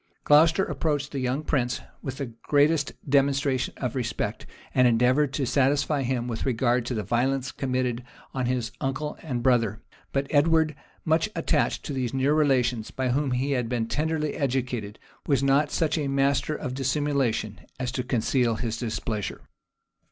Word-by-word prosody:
Glocester 160 +5 +5
approached 150 -2 -1
the 140 - -3
young 130 +3 -1
prince 125 -5 0 0.2
with 135 0 -5
the 135 -5 -5
greatest 145 0 +3 0.2
demonstrations 135 -1 +1
of 125 -4 -3
respect; 125 -2 -3 0.3
and 125 -1 +5
endeavored 125 +5 +3
to 135 - 0
satisfy 140 +3 +2
him 125 -2 -1
with 115 -2 -3
regard 120 -1 +1
to 125 - -2
the 105 - -2
violence 130 +3 0
committed 125 -2 -1 0.3
on 130 -2 -1
his 125 -2 -1
uncle 145 +3 -2
and 125 -7 -3
brother: 115 -4 +2 0.3
but 135 0 0
Edward, 160 +1 +3 0.3
much 160 +6 +2
attached 165 - 0
to 145 - -4
these 130 -1 -2
near 135 +2 +2
relations, 125 -7 +2
by 130 -1 -2
whom 140 +3 +1
he 130 +3 0
had 125 -4 0
been 120 -2 -1
tenderly 155 +2 -1
educated, 125 -6 -2 0.3
was 140 -2 +2
not 140 +2 +3
such 160 +1 0
a 145 - -1
master 140 +2 +1
of 130 -5 -4
dissimulation 135 - 0 0.2
as 125 -1 -2
to 130 - -2
conceal 120 -1 +1
his 115 0 -3
displeasure. 110 -2 -3
130 Hz, 160 wpm, -26 LUFS, 125-145 Hz, 0.3 s, Glocester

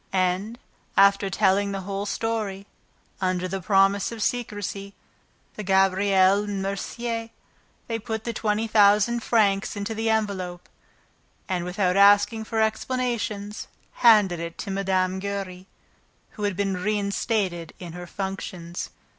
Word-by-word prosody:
And, 190 +4 0 0.4
after 200 0 +5
telling 195 +1 +2
the 195 - -3
whole 200 +2 -4
story, 210 -3 -2 0.6
under 185 -1 0
the 190 +1 -4
promise 195 +2 +3
of 225 -2 -4
secrecy, 205 -4 -3 0.6
to - - -5
Gabriel 195 0 +3
and 205 -1 -3
Mercier, 230 +4 -3 0.6
they 230 -1 -3
put 220 -1 -4
the 235 - -3
twenty 215 0 0
thousand 210 +2 +4
francs 205 -4 +2
into 205 +2 -3
the 225 +1 -1
envelope 195 -5 -2 0.8
and 180 -2 -2
without 180 0 0
asking 205 +2 +5
for 225 0 -2
explanations, 220 -3 -2 0.3
handed 210 -7 +6
it 170 0 -6
to 200 - -5
Mme. 190 -1 0
Giry, 190 -2 -5 0.6
who 210 - -4
had 205 -2 -1
been 195 -2 0
reinstated 200 -2 -1
in 175 -3 -9
her 175 0 -8
functions. 185 -3 -5
200 Hz, 130 wpm, -25 LUFS, 190-215 Hz, 0.8 s, handed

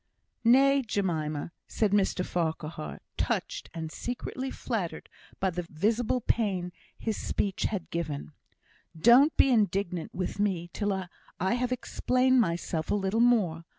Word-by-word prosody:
"Nay, 275 +4 +5
Jemima!" 165 - -2 0.2
said 215 -3 0
Mr 195 -2 +2
Farquhar, 160 - -3 0.2
touched, - - -2
and 160 -1 -5
secretly 250 +5 -4
flattered 190 -12 -4 0.3
by 190 -1 +1
the 180 +1 -3
visible 215 +9 0
pain 195 -6 0 0.3
his 220 -2 -2
speech 195 -2 -1
had 195 -5 -2
given. 155 -3 -3 0.7
"Don't 250 - +6
be 270 - +5
indignant 195 -6 +1
with 185 +2 -4
me 180 -4 0
till 205 -1 -1 0.5
I 190 +4 +1
have 250 +1 -1
explained 255 0 +2
myself 170 -3 -2
a - - +2
little 200 +2 0
more. 210 -9 +3
195 Hz, 130 wpm, -29 LUFS, 170-235 Hz, 0.7 s, Don't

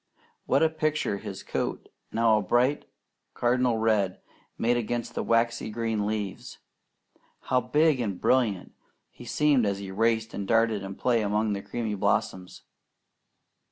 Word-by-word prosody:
What 135 +4 +3
a 160 - +4
picture 155 -9 -1
his 100 -2 -7
coat, - - -3 0.2
now 115 -1 +3
a - - -2
bright 125 +8 +1 0.5
cardinal 125 -1 +2
red, 110 -4 +1 0.4
made 120 +1 +2
against 120 0 -2
the - - -2
waxy 115 -1 +1
green 110 -2 -2
leaves! 105 -3 -4 0.8
How 125 0 +1
big 145 +3 +2
and 100 -6 -2
brilliant 115 -8 +1 0.4
he - - -13
seemed 150 -5 +2
as 100 -2 0
he 100 -1 -7
raced 110 +2 0
and 100 -1 -4
darted 115 -2 +2
in 95 0 -6
play 120 0 +1
among 105 +1 0
the 100 - -3
creamy 115 -1 -4
blossoms! 95 -2 -1
115 Hz, 145 wpm, -27 LUFS, 105-120 Hz, 0.8 s, a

